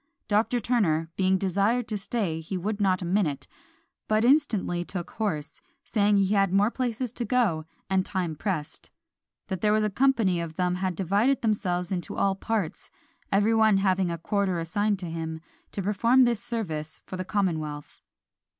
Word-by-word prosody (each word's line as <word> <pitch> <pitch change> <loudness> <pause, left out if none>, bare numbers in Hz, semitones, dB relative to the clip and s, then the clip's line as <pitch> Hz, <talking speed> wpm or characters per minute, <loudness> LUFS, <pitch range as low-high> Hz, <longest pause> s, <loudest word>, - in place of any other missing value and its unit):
Dr. 220 +4 +2
Turner 170 -9 +1
"being 190 0 +2
desired 200 +6 +1
to 215 - -1
stay, 195 -6 -2
he 165 +4 -4
would 205 +3 -3
not 185 -2 +2
a - - -3
minute, 170 -6 0 0.6
but 215 +1 +2
instantly 230 - +2
took 175 -1 -6
horse, 160 -9 -3 0.2
saying 205 -2 +2
he 195 +1 +2
had 195 -2 +3
more 200 +4 +3
places 250 -2 -2
to 245 - -1
go 225 -11 +1
to, - - -38
and 190 -1 +2
time 180 -5 -2
pressed; 160 -3 -4 0.6
_that 190 -4 -4
there 210 - +3
was 215 0 +3
a 210 - 0
company 225 -7 +2
of 165 -1 -6
them 180 0 +1
had 185 0 -2
divided 200 +10 +1
themselves 185 -5 0
into 180 -3 -3
all 195 -1 +2
parts, 200 -3 -3 0.4
every 205 +3 +3
one 220 -2 +4
having 190 -1 +2
had 170 - -2
a - - -35
quarter 200 -4 0
assigned 205 +5 0
to 185 - -7
him, 160 -1 -4 0.3
to 195 - -4
perform 230 +6 +4
this 235 -2 +1
service 165 -11 -4
for - - -7
the 185 - -3
commonwealth_." 160 -7 -2
195 Hz, 175 wpm, -27 LUFS, 175-215 Hz, 0.6 s, one